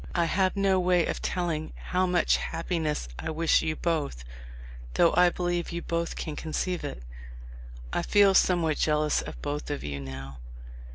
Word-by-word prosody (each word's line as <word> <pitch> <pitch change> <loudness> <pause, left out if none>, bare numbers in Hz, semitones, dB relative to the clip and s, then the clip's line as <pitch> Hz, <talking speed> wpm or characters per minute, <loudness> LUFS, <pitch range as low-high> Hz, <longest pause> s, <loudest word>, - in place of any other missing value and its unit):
I 170 -1 +3
have 185 +3 +1
no 195 -1 +3
way 180 -1 +3
of - - -3
telling 165 -4 -2
how 185 0 -1
much 180 -1 +3
happiness 160 - -2
I - - -4
wish 160 +1 +3
you 155 -1 -1
both, 150 - -2 0.7
though 170 - +4
I 180 0 +6
believe 175 -1 -2
you 170 0 -4
both 170 0 -2
can 155 - -5
conceive 175 +3 -2
it. - - -6 0.9
I - - +1
feel 200 +2 +5
somew 180 -2 +4
r 160 - +1
hat 150 - -3
jealous 150 -1 +2
of - - -8
both 145 +1 -3
of 145 - -3
you 70 -1 -4
now. 65 -1 -8
165 Hz, 175 wpm, -27 LUFS, 150-180 Hz, 0.9 s, I